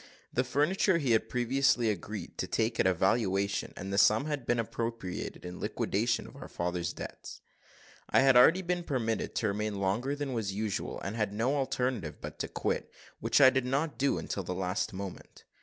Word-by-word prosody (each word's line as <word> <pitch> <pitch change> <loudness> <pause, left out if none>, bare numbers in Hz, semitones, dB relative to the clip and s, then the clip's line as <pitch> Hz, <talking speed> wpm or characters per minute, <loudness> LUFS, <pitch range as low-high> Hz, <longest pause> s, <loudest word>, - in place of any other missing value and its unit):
The 125 - +2
furniture 155 +8 +2
he 140 -7 0
had 110 - +2
previously 125 -1 +2
agreed 105 +2 -6
to - - -1
take 115 +1 0
at - - +4
a 95 - +4
valuation, 100 +1 +1
and 95 +1 -5
the 100 - +3
sum 110 +6 +5
had 145 -5 -3
been 120 - +2
appropriated 115 -5 -4
in 90 0 -7
liquidation - - 0
of - - -13
our - - -9
father's 85 0 -2
debts. - - -8 0.7
I - - +5
had 135 -1 +5
already 165 +10 +7
been 175 0 -1
permitted 115 -8 -2
to 110 - +1
remain 105 +1 -2
longer 110 +9 0
than 145 -2 -3
was 110 -5 -2
usual, 105 -1 -2
and 95 +4 -4
had 105 -3 0
no 120 +7 +1
alternative 130 -4 -1
but - - -8
to - - -2
quit, - - -2 0.3
which - - +2
I 130 -2 +8
did 130 -1 0
not 140 +4 -1
do 140 +1 +2
until 100 - -3
the 90 0 -4
last 90 +1 -1
moment. 95 -1 -8
115 Hz, 190 wpm, -30 LUFS, 100-135 Hz, 0.7 s, I